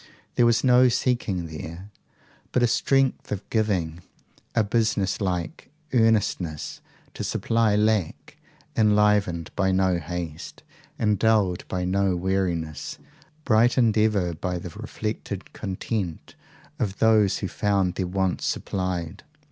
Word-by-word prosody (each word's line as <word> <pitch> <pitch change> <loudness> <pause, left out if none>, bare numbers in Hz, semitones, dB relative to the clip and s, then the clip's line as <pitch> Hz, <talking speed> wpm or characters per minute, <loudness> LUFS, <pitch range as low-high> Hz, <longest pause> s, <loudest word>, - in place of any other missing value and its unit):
There 120 - +4
was 115 -1 +3
no 125 -1 +6
seeking 120 -7 0
there, 80 +5 -8 0.6
but 125 - +2
a - - +5
strength 135 +3 +1
of 105 -1 -4
giving, 90 -7 0 0.5
a 115 - +4
business 105 -2 0
like 90 -4 -3 0.2
earnestness 105 - +1 0.3
to - - -5
supply 115 -2 +1
lack, 105 -5 0 0.4
enlivened 105 -6 +2
by 95 -1 +2
no 95 -2 +2
haste, 85 -1 -6 0.3
and 105 -3 +1
dulled 105 -6 +2
by 90 -1 -2
no 95 0 +1
weariness, 90 -4 -2 0.5
brightened 115 -1 +4
ever 105 -5 +2
by 90 +2 -3
the 90 +1 -6
reflected 105 -1 -5
content 95 -3 -4 0.5
of 105 -6 -2
those 110 -3 +4
who 95 - -3
found 100 -3 0
their 90 0 -2
wants 95 0 -1
supplied. 90 -1 -3
100 Hz, 120 wpm, -25 LUFS, 90-110 Hz, 0.6 s, no